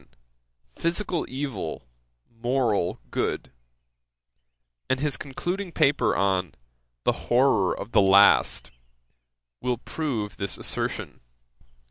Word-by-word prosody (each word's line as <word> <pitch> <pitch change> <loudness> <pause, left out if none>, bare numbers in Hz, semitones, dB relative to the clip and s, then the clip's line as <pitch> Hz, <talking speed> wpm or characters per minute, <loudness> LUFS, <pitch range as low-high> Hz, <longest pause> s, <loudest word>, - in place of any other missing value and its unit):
89, 65 -3 -29 0.6
'Physical 175 0 0
evil 125 - -4 0.4
moral 115 -6 0
goode;' - - -2 1.4
and 130 - +1
his 145 -1 +1
concluding 175 +7 -4
paper 145 -3 +2
on 95 -4 0 0.5
'The - - +3 0.2
horrour 120 -7 +3
of 115 - -7
the 105 - +5
last;' 100 +1 +5 0.9
will 125 -1 0
prove 120 -6 -4
this 100 -3 -1
assertion. - - -3
120 Hz, 95 wpm, -26 LUFS, 100-145 Hz, 1.4 s, the